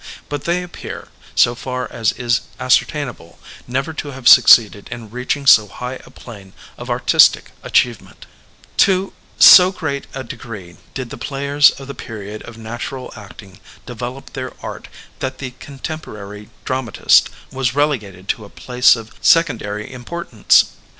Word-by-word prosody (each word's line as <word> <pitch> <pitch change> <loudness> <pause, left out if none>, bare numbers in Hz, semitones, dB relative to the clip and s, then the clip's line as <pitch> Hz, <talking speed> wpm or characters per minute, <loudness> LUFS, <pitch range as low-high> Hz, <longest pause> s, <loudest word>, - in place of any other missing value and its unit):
But 145 -1 -5
they 175 +1 0
appear, 180 - -9 0.3
so 120 - +4
far 125 +1 -5
as 115 -3 0
is 120 0 0 0.2
ascertainable, 125 - -1 0.3
never 135 +5 -2
to 155 - -6
have 135 -3 -5
succeeded 105 -3 +6
in 115 -3 -9
reaching 125 +4 -3
so 110 -5 +7
high 125 +6 -7
a - - -16
plain 100 -5 -13 0.2
of - - -10
artistic - - +3
achievement 120 -3 -1 0.5
To 190 0 +2 0.2
so 180 0 +9
great 155 -7 -4
a 135 - -5
degree 100 -7 -10 0.2
did 130 -3 -5
the - - -8
players 140 +1 +3
of 135 - -9
the 140 - -7
period 110 -3 -8
of 115 - -13
natural 120 +3 -7
acting 100 -1 -13 0.3
develop 125 +2 -8
their 130 -1 -6
art - - -7 0.3
that 130 0 -4
the 130 -2 -6
contem 150 +3 -7
porary 105 -2 -10 0.2
dramatist 130 -5 +2 0.2
was 130 -2 -2
relegated 105 -11 -2
to 110 - -2
a 100 - -12
place 125 +3 +3
of 115 -1 -10
sec 165 0 +5
ondary 105 -4 -6
importance. 125 -2 +1
125 Hz, 150 wpm, -18 LUFS, 110-140 Hz, 0.5 s, so